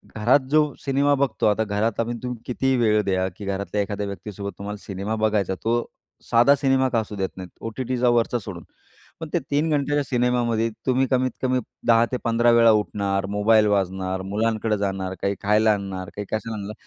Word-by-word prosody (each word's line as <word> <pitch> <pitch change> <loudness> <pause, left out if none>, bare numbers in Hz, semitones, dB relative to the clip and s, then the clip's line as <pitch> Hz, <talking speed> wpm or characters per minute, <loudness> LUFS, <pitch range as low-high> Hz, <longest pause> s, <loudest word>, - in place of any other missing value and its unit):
घरात 115 +6 +4
जो 150 -1 +3
सिनेमा 140 +1 +2
बघतो, 135 -7 0
आता 105 +1 +2
घरात 105 +2 -1
आपण 120 +1 -1
तुम्ही 125 -1 -4
कितीही 130 +1 0
वेळ 110 -3 +3
द्या, 95 -1 0
की 105 - -8
घरातल्या 100 +1 -2
एखाद्या 100 +1 -3
व्यक्तीसोबत 100 0 -6
तुम्हाला 105 +1 -6
सिनेमा 100 +3 -3
बघायचा. 105 -3 0
तो 115 +7 -1 0.5
साधा 120 +5 +6
सिनेमा 135 -1 +2
का 115 -2 +1
असू 105 -1 -5
देत 95 -1 -2
नाहीत. 90 -1 -7
ओ-टी-टीचा 125 +2 -1
वरचा 120 0 +2
सोडून. 95 -5 -8 0.6
पण 160 -2 -6
ते 175 - +2
3 150 +3 +1
घंट्याच्या 145 -1 +1
सिनेमामध्ये 120 -3 +1 0.2
तुम्ही 130 0 +2
कमीत-कमी 130 0 0 0.3
10 115 0 +5
ते 125 - 0
15 120 +1 +3
वेळा 115 -1 +6
उठणार, 100 -2 0
मोबाईल 105 +2 +3
वाजणार, 95 -1 -1
मुलांकडं 110 +2 -1
जाणार, 95 -2 -2
काही 100 0 0
खायला 105 +1 +3
आणणार, 95 -2 -5
काही 105 - -5
कशाला 110 +1 -3
आणणार. 100 +1 -6
110 Hz, 180 wpm, -23 LUFS, 100-125 Hz, 0.6 s, साधा